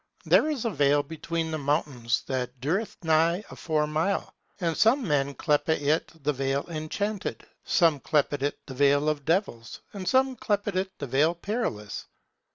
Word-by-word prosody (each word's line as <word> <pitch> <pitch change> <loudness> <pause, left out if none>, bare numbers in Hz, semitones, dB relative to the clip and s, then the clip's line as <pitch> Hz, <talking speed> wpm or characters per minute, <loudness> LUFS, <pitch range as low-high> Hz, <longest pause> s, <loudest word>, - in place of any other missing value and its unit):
There 310 - +4
is 275 -6 -2
a 230 - +1
vale 145 -3 +3
between 165 +2 -3
the 155 - -2
mountains, 135 -4 0
that 130 -1 -3
dureth 180 - -1
nigh 165 +4 +3
a - - -8
four 155 -2 0
mile. 160 +6 -1 0.3
And 165 -3 0
some 235 - +3
men 140 -2 +1
clepe 150 0 +1
it 155 0 +1
the 150 +1 +1
Vale 135 +1 -1
Enchanted, 185 +6 -3 0.2
some 165 -4 +3
clepe 145 +2 +1
it 145 +1 -1
the 135 - -8
Vale 145 +2 +3
of 145 -2 -2
Devils, 160 - -1
and 190 -3 -6
some 265 0 +3
clepe 205 -3 -1
it 190 +1 -1
the 145 - -4
Vale 145 +6 +2
Perilous. 170 - -3
155 Hz, 165 wpm, -27 LUFS, 140-185 Hz, 0.3 s, There